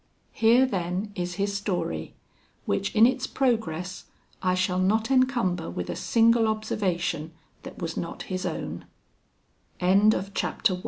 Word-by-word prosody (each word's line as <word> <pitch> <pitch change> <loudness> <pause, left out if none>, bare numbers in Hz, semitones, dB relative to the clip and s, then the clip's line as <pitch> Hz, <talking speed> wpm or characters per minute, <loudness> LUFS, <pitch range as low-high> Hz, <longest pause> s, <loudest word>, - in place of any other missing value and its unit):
Here, 235 +3 +4
then, 190 -2 -2
is 180 -2 -4
his 200 +1 -1
story, 180 - -3 0.5
which 195 - 0
in 220 +1 +7
its 255 +1 +1
progress 185 -9 -1 0.4
I 185 -1 +2
shall 185 0 0
not 220 +6 +1
encumber 245 - +1
with 90 0 -4
a - - -4
single 230 0 +3
observation 185 -7 -2 0.3
that - - -10
was 165 -1 -4
not 170 - -4
his 185 0 -4
own. - - -4 0.9
II 180 - -1
I - - +6
loved 200 -1 +3
Ophelia! 185 -2 0
195 Hz, 145 wpm, -26 LUFS, 180-220 Hz, 0.9 s, in